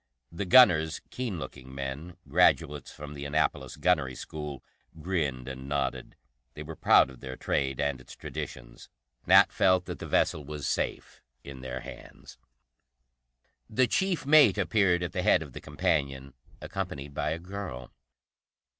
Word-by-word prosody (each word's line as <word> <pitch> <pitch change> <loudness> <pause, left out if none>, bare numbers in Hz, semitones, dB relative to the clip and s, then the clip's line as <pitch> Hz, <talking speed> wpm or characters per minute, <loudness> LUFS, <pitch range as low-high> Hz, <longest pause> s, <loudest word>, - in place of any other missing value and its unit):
The 100 +4 -4
gunners, 85 -8 +6
keen 120 -7 -3
looking 65 -4 -9
men, 70 +6 -6
graduates 75 -2 +2
from 75 0 -9
the 70 -1 -7
Annapolis 75 +2 -1
gunnery 75 -8 +1
school, 75 0 -7 0.4
grinned 75 -8 -2
and 65 +1 -7
nodded. 70 -1 -2 0.4
They 75 - -7
were 80 +1 -8
proud 65 - +5
of 65 - -14
their 65 -1 -7
trade 65 0 -1
and 70 -3 -1
its 65 - -13
traditions; - - -8 0.4
Nat - - +7
felt 95 -1 +3
that - - -6
the - - -6
vessel 75 - +1
was 75 -1 -6
safe - - -3 0.2
in 65 -2 -9
their 65 0 -5
hands. - - -12 1.3
The 130 +4 +3
chief 190 +3 0
mate 150 +1 +6
appeared 95 -5 +2
at 90 - -3
the - - -2
head - - +4
of - - -13
the - - -8
companion, 70 -2 -1 0.3
accompanied 70 +1 -5
by 75 - -1
a 80 - -2
girl. 90 -9 -7
75 Hz, 150 wpm, -28 LUFS, 65-90 Hz, 1.3 s, Nat